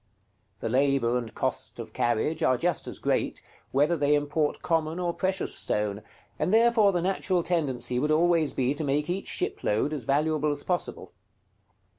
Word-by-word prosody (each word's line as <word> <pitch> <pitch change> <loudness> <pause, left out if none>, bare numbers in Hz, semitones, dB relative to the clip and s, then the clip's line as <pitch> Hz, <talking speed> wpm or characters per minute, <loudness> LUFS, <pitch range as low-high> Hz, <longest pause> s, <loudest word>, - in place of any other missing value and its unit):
The - - -2
labor 130 -1 +2
and 120 -2 -2
cost - - -3
of - - -8
carriage 120 +7 0
are 130 - +3
just 175 +4 -1
as - - -5
great, - - -1 0.3
whether 145 +6 +2
they 145 -1 +2
import 145 +1 -1
common 160 -1 0
or 175 -1 -1
precious 190 +1 -1
stone, 105 0 0 0.4
and - - 0
therefore 225 -2 +5
the 175 -2 -1
natural 185 -1 0
tendency 130 -8 0
would 150 +3 0
always 165 0 +3
be 130 +1 +1
to 145 - -4
make 145 +3 0
each 195 +2 -3
shipload 110 +9 -1
as 140 -6 -4
valuable 150 +2 +1
as 145 -1 -3
possible. 180 -1 -3
150 Hz, 165 wpm, -27 LUFS, 135-175 Hz, 0.4 s, therefore